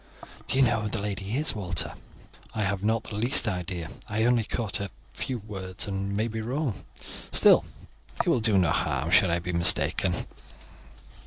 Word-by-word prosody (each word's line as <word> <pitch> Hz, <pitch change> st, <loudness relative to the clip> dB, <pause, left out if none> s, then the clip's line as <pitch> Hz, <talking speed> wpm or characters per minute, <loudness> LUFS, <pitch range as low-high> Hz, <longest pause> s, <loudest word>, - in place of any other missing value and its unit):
"Do -, -, +2 dB
you 135 Hz, -, +5 dB
know 115 Hz, -3 st, +2 dB
who 105 Hz, -, -3 dB
the 115 Hz, -, -3 dB
lady 100 Hz, +1 st, -4 dB
is, 155 Hz, +2 st, +2 dB
Walter?" 90 Hz, -6 st, -3 dB, 0.6 s
"I 110 Hz, -, 0 dB
have 100 Hz, 0 st, -1 dB
not 110 Hz, +1 st, +1 dB
the 105 Hz, -, -6 dB
least 120 Hz, +1 st, +3 dB
idea. 90 Hz, -3 st, -3 dB, 0.2 s
I 110 Hz, +1 st, 0 dB
only 120 Hz, -1 st, +3 dB
caught 110 Hz, -1 st, -3 dB
a 100 Hz, 0 st, -4 dB, 0.2 s
few 130 Hz, -, -3 dB
words, 95 Hz, -3 st, -5 dB
and 100 Hz, 0 st, -3 dB
may 110 Hz, +2 st, 0 dB
be 110 Hz, -1 st, -4 dB
wrong; 125 Hz, 0 st, -3 dB, 0.5 s
still, -, -, +6 dB, 0.5 s
it -, -, 0 dB
will -, -, +3 dB
do 110 Hz, -3 st, +3 dB
no 90 Hz, -4 st, +3 dB
harm -, -, -1 dB
should -, -, +5 dB
I 85 Hz, -, +1 dB
be 90 Hz, +1 st, -4 dB
mistaken." 85 Hz, +1 st, +3 dB
105 Hz, 180 wpm, -27 LUFS, 95-115 Hz, 0.6 s, still